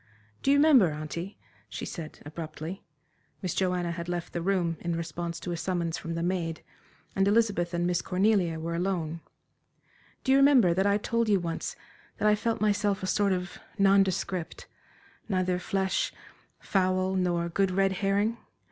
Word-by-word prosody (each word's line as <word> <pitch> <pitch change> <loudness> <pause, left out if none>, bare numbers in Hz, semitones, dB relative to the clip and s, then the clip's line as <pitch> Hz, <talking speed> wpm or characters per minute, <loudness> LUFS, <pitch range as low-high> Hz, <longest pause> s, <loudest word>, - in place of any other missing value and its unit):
"Do - - 0
you 285 - +6
remember, 285 - +6
auntie," 155 +5 -6 0.3
she - - -5
said, 160 -3 -7
abruptly 160 +3 -7 0.6
Miss 180 - -1
Joanna 180 -2 0
had 170 0 -5
left 175 -1 -4
the 170 - -2
room 175 -3 0
in 170 -1 -2
response 170 +1 -4
to 175 - -4
a 170 - -2
summons 170 -2 -1
from 165 0 -5
the 165 - -2
maid, 170 -2 -2 0.5
and 195 0 +3
Elizabeth 205 -5 +2
and 175 0 -1
Miss 175 -1 +1
Cornelia 185 -4 +1
were 165 +1 -3
alone 170 -2 -2 1.0
"do 265 - +1
you 270 - +6
remember 265 -11 +6
that 190 +3 +2
I 200 0 +3
told 230 +1 0
you 200 -2 +4
once 165 -2 -4 0.4
that 215 - +1
I 210 - +6
felt 225 +2 -1
myself 205 -2 +1
a - - 0
sort 200 +1 +2
of 180 0 -3 0.2
nondescript 195 -3 +1 0.6
neither 185 -2 +1
flesh, 190 +1 0 0.5
fowl, 185 -1 +1
nor 175 -2 0
good 195 +3 +1
red 195 +1 +2
herring? 200 +4 0
185 Hz, 165 wpm, -28 LUFS, 170-200 Hz, 1.0 s, you